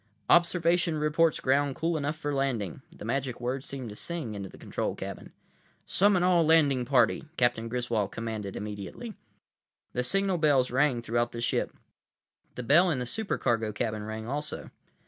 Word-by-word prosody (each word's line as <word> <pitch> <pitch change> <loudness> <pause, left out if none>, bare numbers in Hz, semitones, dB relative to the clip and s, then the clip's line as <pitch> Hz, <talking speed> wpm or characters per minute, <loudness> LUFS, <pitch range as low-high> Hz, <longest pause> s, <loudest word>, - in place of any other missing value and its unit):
"Observation 170 -1 +3
reports 150 +1 +2
ground 140 +1 +2
cool 165 +1 0
enough 150 0 -1
for 145 -1 -3
landing!" 125 - -1
The - - -10
magic 130 +1 -2
words 130 +2 -3
seemed 130 -4 -6
to 105 - -8
sing 160 -5 -5
into 100 -2 -6
the - - -14
control - - -3
cabin. - - -7 0.5
"Summon 195 -2 +3
all 180 -2 +4
landing 145 -6 +4
party," 130 +4 +3
Captain 120 -2 +1
Griswold 120 -4 -1
commanded 110 -4 -5
immediately. 105 - -6 0.8
The 125 - 0
signal 195 +6 +1
bells 140 -5 +3
rang 130 -2 +2
throughout 120 +1 0
the 115 - -5
ship. 115 - -1 0.8
The 125 - -5
bell 170 +9 +5
in 155 - +1
the 125 - -2
supercargo 120 - -1
cabin 110 0 -2
rang 110 +1 -5
also. 145 +4 -4
130 Hz, 160 wpm, -28 LUFS, 115-160 Hz, 0.8 s, bell